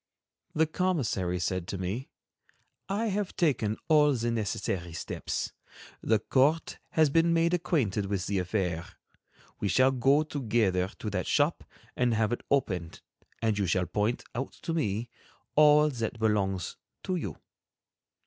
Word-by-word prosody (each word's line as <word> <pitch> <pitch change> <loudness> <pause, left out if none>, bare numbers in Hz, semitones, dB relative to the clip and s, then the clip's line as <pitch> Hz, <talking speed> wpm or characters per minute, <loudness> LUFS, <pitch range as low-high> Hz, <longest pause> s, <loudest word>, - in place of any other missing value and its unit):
The 160 +1 +4
commissary 145 - 0
said 90 0 -2
to 95 - -3
me: 95 +9 -4 0.8
"I 215 +3 0
have 200 -1 -2
taken 120 - +1
all 150 -2 +5
the 120 -1 -1
necessary 95 -6 -2
steps. 85 - -3 0.5
The 110 - +3
court 140 +9 +1
has 155 -3 +4
been 165 +2 +4
made 170 +1 +2
acquainted 140 - 0
with 95 -2 -2
the 100 -1 0
affair. 90 -3 -1 0.7
We 105 - -1
shall 130 +7 +4
go 135 +4 +3
together 110 -11 0
to - - -4
that - - -2
shop - - +2 0.3
and 120 -2 +2
have 110 0 +1
it - - -3
opened, 90 -12 -1 0.4
and 110 -2 +1
you 100 - +1
shall 90 +2 +1
point 105 +7 -1
out 135 +3 -4
to 165 - -2
me 115 -7 -1 0.5
all 150 0 +6
that 115 -3 -3
belongs 100 -5 0 0.3
to 185 - -1
you." 175 - -4
115 Hz, 145 wpm, -29 LUFS, 95-150 Hz, 0.8 s, all